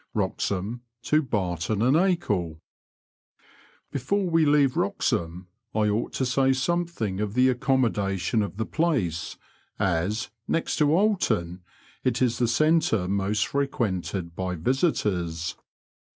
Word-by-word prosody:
Wboxhah 100 +5 -1 0.2
to 155 +1 +3
Babton 100 - -1
and 135 - +4
Agle. 105 - +1 1.3
Before 185 +9 0
we 165 -2 +3
leave 145 -3 +4
Wroxham 105 - -1 0.3
I 105 -1 +2
onght 105 +3 -1
to 130 - 0
say 135 +1 +3
something 135 - -1
of 105 0 -2
the 130 +1 +5
accommodation 115 -7 +1
of 100 -1 -4
the 110 - -1
place, 125 - -1 0.4
as, 95 +5 -1 0.2
next 165 - -1
to 150 - +4
Oolton, 155 - +1 0.4
it 125 -2 +1
is 125 -2 +1
the 120 - +2
centre 135 - +2
most 100 +1 0
frequented 95 -10 -2
by 90 0 -2
visitors. 90 - 0
115 Hz, 120 wpm, -26 LUFS, 95-145 Hz, 1.3 s, the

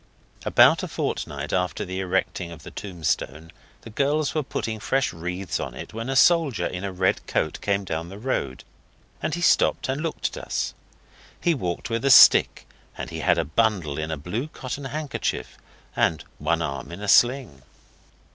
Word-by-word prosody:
About - - +6
a - - -4
fortnight 75 0 -3
after 90 -1 -1
the 95 +1 -4
erecting 95 -1 -1
of 85 - -11
the - - -10
tombstone 80 -4 -3 0.3
the 115 - -11
girls 145 +5 0
were 155 - +1
putting 110 -5 -4
fresh 135 +3 0
wreaths 90 +1 -4
on - - -5
it - - -8
when 115 +3 -5
a 135 - -1
soldier 160 -1 +4
in 90 +1 -4
a 100 - -3
red 95 0 0
coat 80 - -1
came 100 0 0
down 85 -2 -4
the 100 - -9
road, 105 - -3 0.6
and 155 - -1
he 175 - -5
stopped - - +3
and 135 +3 -2
looked 165 -1 -3
at - - -7
us. - - -2 0.7
He 170 - +2
walked 90 - -4
with 115 0 -1
a 140 - +3
stick, 130 - +7 0.3
and - - -6
he - - -5
had - - +2
a - - 0
bundle 85 -4 0
in 80 0 -3
a 80 - -3
blue 105 - -4
cotton 135 -2 -6
handkerchief, 140 - -3 0.4
and 80 - +1 0.2
one 85 0 0
arm 70 -1 -5
in 85 +4 -8
a 105 - -4
sling. 120 - +3
100 Hz, 185 wpm, -24 LUFS, 85-135 Hz, 0.7 s, stick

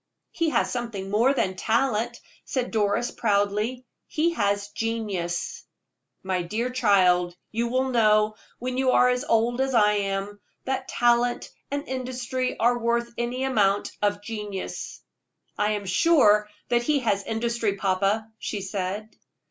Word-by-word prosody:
"He 330 -1 0
has - - +1
something 225 -6 -4
more 230 +6 +4
than 190 -9 0
talent," 230 +2 0 0.2
said 255 -2 -2
Doris, 210 +1 +1
proudly; 210 +4 0 0.2
"he 325 +2 +1
has 205 -5 0
genius." 205 -6 -3 0.6
"My 190 -1 -1
dear 220 +8 -2
child, 185 -7 +3 0.2
you 235 +2 0
will 260 +2 0
know, 215 -3 +3 0.2
when 255 +1 -3
you 260 -1 +3
are 250 - +5
as 250 +1 0
old 240 0 +1
as 265 -1 0
I 210 -2 +5
am, 200 0 -2 0.3
that 265 0 -2
talent 240 0 +1 0.2
and 285 +1 -3
industry 255 0 -3
are 240 +2 +2
worth 235 0 0
any 245 +2 -2
amount 205 -7 +2
of 205 0 0
genius." 210 -3 -6 0.5
"I 210 +1 +1
am 205 -1 -3
sure 210 - +4 0.2
that 240 -1 +3
he 285 +3 +1
has 205 -4 +1
industry, 225 -1 -1
papa," 195 +3 +1
she 205 - -4
said. 195 +2 -4
225 Hz, 140 wpm, -25 LUFS, 205-250 Hz, 0.6 s, are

